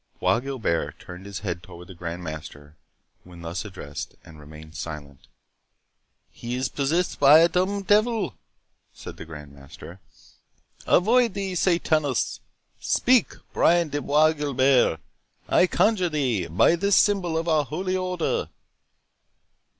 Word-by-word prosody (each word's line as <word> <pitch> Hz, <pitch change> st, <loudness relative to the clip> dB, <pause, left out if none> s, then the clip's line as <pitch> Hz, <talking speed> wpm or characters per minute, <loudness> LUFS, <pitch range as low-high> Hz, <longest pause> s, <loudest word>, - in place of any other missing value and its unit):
Bois 95 Hz, +4 st, +2 dB
Guilbert 125 Hz, -11 st, -3 dB
turned 90 Hz, +3 st, -11 dB
his 100 Hz, -2 st, -7 dB
head 85 Hz, -4 st, -4 dB
towards 85 Hz, 0 st, -13 dB
the 95 Hz, -, -11 dB
Grand 85 Hz, 0 st, -6 dB
Master 75 Hz, -2 st, -9 dB, 0.5 s
when 90 Hz, -1 st, -13 dB
thus 85 Hz, +3 st, -4 dB
addressed, 95 Hz, -8 st, -8 dB
and 80 Hz, -1 st, -14 dB
remained 75 Hz, +1 st, -13 dB
silent. 70 Hz, -4 st, -8 dB, 1.0 s
"He 120 Hz, +1 st, -6 dB
is 130 Hz, 0 st, -2 dB
possessed 160 Hz, +6 st, -1 dB
by 145 Hz, +2 st, +8 dB
a 165 Hz, +1 st, +6 dB
dumb 190 Hz, +3 st, -1 dB
devil," 215 Hz, +2 st, +2 dB, 0.6 s
said -, -, -11 dB
the -, -, -9 dB
Grand 75 Hz, -3 st, -11 dB
Master. 70 Hz, +6 st, -13 dB, 0.9 s
"Avoid 230 Hz, +3 st, +3 dB
thee, 195 Hz, -1 st, -3 dB
Sathanus!—Speak, 170 Hz, -, 0 dB, 0.2 s
Brian 170 Hz, -1 st, +3 dB
de 145 Hz, 0 st, -3 dB
Bois 155 Hz, +3 st, +3 dB
Guilbert, 135 Hz, -, +2 dB, 0.5 s
I 180 Hz, -, +4 dB
conjure 190 Hz, -2 st, +2 dB
thee, 125 Hz, -, -1 dB
by 90 Hz, -, +3 dB
this 200 Hz, +3 st, +2 dB
symbol 185 Hz, -6 st, +2 dB
of 165 Hz, +1 st, -2 dB
our 155 Hz, -2 st, +2 dB
Holy 185 Hz, +6 st, -3 dB
Order." 180 Hz, -2 st, -2 dB
135 Hz, 130 wpm, -24 LUFS, -, 1.0 s, by